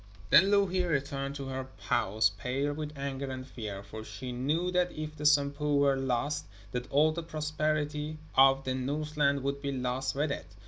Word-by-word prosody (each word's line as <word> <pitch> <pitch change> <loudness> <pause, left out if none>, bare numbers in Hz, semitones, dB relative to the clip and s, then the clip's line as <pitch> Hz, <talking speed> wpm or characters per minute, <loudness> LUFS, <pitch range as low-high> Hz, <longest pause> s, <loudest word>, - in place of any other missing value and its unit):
Then 190 +6 +8
Louhi 195 -3 +3
returned 140 -3 -1
to 135 -2 -5
her 130 0 -4
house 105 +1 +2
pale 135 +7 -1
with 150 0 -6
anger 140 0 -3
and 130 0 -5
fear, 105 -6 -6
for 110 +1 -8
she 110 +4 -7
knew 150 +9 0
that 180 0 +2
if 155 0 -6
the 150 0 +1
Sampo 145 0 +3
were 140 -1 +4
lost 135 +3 -1 0.2
that 125 +1 -4
all 150 +3 +4
the 170 +2 -3
prosperity 155 -1 -2 0.2
of 135 0 +6
the 130 - -1
Northland 140 +1 0
would 140 0 -2
be 140 - -2
lost 130 0 -2
with 145 +1 0
it. 85 - -6
140 Hz, 180 wpm, -30 LUFS, 130-150 Hz, 0.2 s, Then